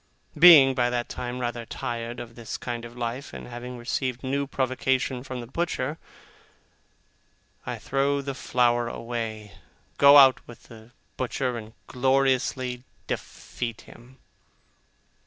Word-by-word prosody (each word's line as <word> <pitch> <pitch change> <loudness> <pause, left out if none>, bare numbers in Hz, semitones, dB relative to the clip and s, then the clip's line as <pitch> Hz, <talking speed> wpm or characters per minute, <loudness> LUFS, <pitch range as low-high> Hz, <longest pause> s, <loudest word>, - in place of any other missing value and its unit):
Being, 150 -5 +9
by 120 -2 +1
that 120 -1 -2
time, 125 0 -5
rather 120 -1 -3
tired 115 +1 -5
of 120 -1 -8
this 115 -1 -6
kind 120 -1 -5
of 120 +1 -12
life, 120 +3 -4
and - - -8
having 125 +1 -8
received 125 +1 -3
new 140 +1 -1
provocation 130 -1 -1
from 130 -2 -6
the - - -7
butcher, 150 +1 -3 1.7
I - - -3
throw 140 +1 0
the 140 0 -4
flower 120 -2 +1
away, 115 -3 -5 0.4
go 140 +1 +9
out 135 -2 +7
with 120 - -13
the 110 0 -15 0.3
butcher, 130 0 -2
and 110 -1 -8
gloriously 130 -1 0 0.2
defeat 115 -2 -5
him. 125 +2 -16
125 Hz, 130 wpm, -26 LUFS, 120-135 Hz, 1.7 s, Being